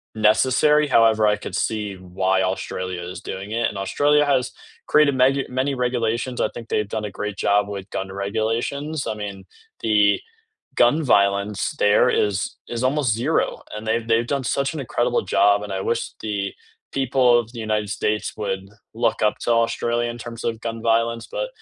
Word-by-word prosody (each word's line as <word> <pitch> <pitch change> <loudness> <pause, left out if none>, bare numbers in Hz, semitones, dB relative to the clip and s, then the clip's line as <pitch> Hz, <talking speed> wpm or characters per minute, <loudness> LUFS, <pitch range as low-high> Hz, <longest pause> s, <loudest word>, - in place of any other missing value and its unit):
necessary; 130 +8 +4
however, 115 -4 +4
I 105 - +3
could - - -7
see 105 -3 -2
why 95 +1 0
Australia 95 -1 -3
is 90 +1 -7
doing 95 +2 -6
it 115 +1 +1
and 105 - -8
Australia 145 +9 +2
has 135 -3 +1 0.4
created 150 -2 +4
meg 135 +2 +3
many 130 +2 -1
regulations, 120 0 -1
I - - +1
think 115 -1 -8
they've 105 -1 0
done 110 -1 -2
a 105 - -5
great 105 -1 -3
job 100 0 +2
with 100 -1 -6
gun 95 0 -3
regulations. 115 +9 -2
I - - -1
mean, 105 -2 -6 0.4
the 105 -2 +3 0.6
gun 145 +7 +4
violence 100 -1 +2
there 105 +4 +5
is 105 -5 +1 0.4
is 120 +2 -2
almost 135 -3 +2
0 130 +9 0
and 105 - -6
they've 115 +1 0
they've 115 +1 +2
done 135 - -2
such 140 +5 -1
an 155 - -4
incredible 120 -1 0
job, 100 0 +4
and 105 -1 -6
I 95 - -2
wish 115 0 +1 0.2
the 105 -1 -2 0.6
people 130 -1 +2
of 115 0 -10
the 120 - -9
United 105 -1 0
States 105 0 -1
would 95 -2 -2 0.4
look 115 -1 +1
up 105 - +2
to - - -2
Australia 120 +1 -1
in 120 - -7
terms 115 -1 -8
of 115 -1 -2
gun 115 -1 -4
violence, 115 0 +1
but - - -3
115 Hz, 180 wpm, -22 LUFS, 105-125 Hz, 0.6 s, there